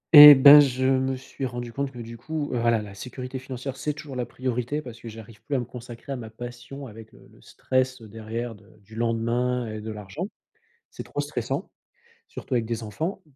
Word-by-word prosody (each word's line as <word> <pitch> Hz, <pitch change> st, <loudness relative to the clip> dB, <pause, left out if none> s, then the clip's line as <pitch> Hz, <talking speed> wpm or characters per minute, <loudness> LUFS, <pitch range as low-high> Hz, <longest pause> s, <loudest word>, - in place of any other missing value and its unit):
Et 145 Hz, -1 st, +14 dB
ben 140 Hz, +2 st, +10 dB
je 130 Hz, -2 st, +2 dB
me 130 Hz, 0 st, +2 dB
suis 135 Hz, +1 st, -6 dB
rendu 120 Hz, -1 st, -6 dB
compte 140 Hz, +1 st, -2 dB
que 125 Hz, -, -13 dB
du 115 Hz, 0 st, -8 dB
coup, 155 Hz, +3 st, -4 dB
voilà 115 Hz, -2 st, +1 dB
la 100 Hz, -1 st, -10 dB
sécurité 125 Hz, +5 st, -7 dB
financière 130 Hz, 0 st, -6 dB
c'est 150 Hz, +3 st, -2 dB
toujours 145 Hz, -3 st, -9 dB
la 125 Hz, -1 st, -2 dB
priorité 125 Hz, +3 st, -2 dB
parce 120 Hz, -2 st, -10 dB
que 115 Hz, -, -9 dB
j'arrive 110 Hz, -1 st, -12 dB
plus 145 Hz, -, -3 dB
à 130 Hz, -, +2 dB
me 120 Hz, -, -3 dB
consacrer 120 Hz, +2 st, -10 dB
à 135 Hz, -, -1 dB
ma 115 Hz, -3 st, -7 dB
passion 120 Hz, +4 st, -9 dB
avec, 110 Hz, -1 st, -12 dB
heu, -, -, -18 dB
le -, -, -20 dB
stress, 130 Hz, 0 st, -1 dB
heu, 110 Hz, -, -12 dB
derrière 115 Hz, +2 st, -5 dB
de 105 Hz, -, -17 dB, 0.2 s
du 110 Hz, +3 st, -18 dB
lendemain 120 Hz, +2 st, 0 dB
et 110 Hz, -, -6 dB
de 110 Hz, -, -5 dB
l'argent. 105 Hz, -, -6 dB, 0.6 s
C'est -, -, -8 dB
trop -, -, -6 dB
stressant, -, -, -3 dB, 0.6 s
surtout 130 Hz, -, -5 dB
avec 120 Hz, -, +1 dB
des 115 Hz, 0 st, -4 dB
enfants, 160 Hz, -, -4 dB
125 Hz, 210 wpm, -25 LUFS, 115-135 Hz, 0.6 s, Et